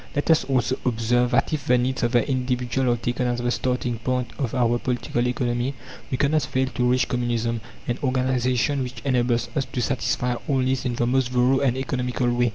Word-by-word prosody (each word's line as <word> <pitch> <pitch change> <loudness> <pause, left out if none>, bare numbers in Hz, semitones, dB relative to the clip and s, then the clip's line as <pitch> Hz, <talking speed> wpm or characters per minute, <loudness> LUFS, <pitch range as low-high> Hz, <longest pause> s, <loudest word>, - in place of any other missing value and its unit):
Let 145 +3 +2
us 160 - +4
also 130 -2 0
observe 120 +1 +1
that 125 +5 +1
if 145 -4 -3
the 125 - +5
needs 125 +1 -1
of 120 +1 0
the 120 -2 +3
individual 125 -1 0
are 120 - +1
taken 120 +1 -1
as 120 0 0
the 120 0 0
starting 125 -2 -1
point 125 0 -1
of 130 -3 -2
our 120 -1 +2
political 120 -1 -1
economy, 125 +1 -1 0.3
we 130 - -1
cannot 150 +3 +2
fail 130 -1 0
to 125 -1 0
reach 125 -1 +2
Communism, 120 -2 -1 0.3
an 120 - -1
organization 130 +1 +1
which 125 0 -6
enables 120 -3 +1
us 140 -3 0
to - - -5
satisfy 125 -1 0
all 140 - +1
needs 130 0 0
in 120 -1 -1
the 120 - 0
most 130 0 +1
thorough 125 +1 +3
and 130 -2 +1
economical 125 -2 -1
way. 120 0 +2
125 Hz, 205 wpm, -24 LUFS, 120-130 Hz, 0.3 s, the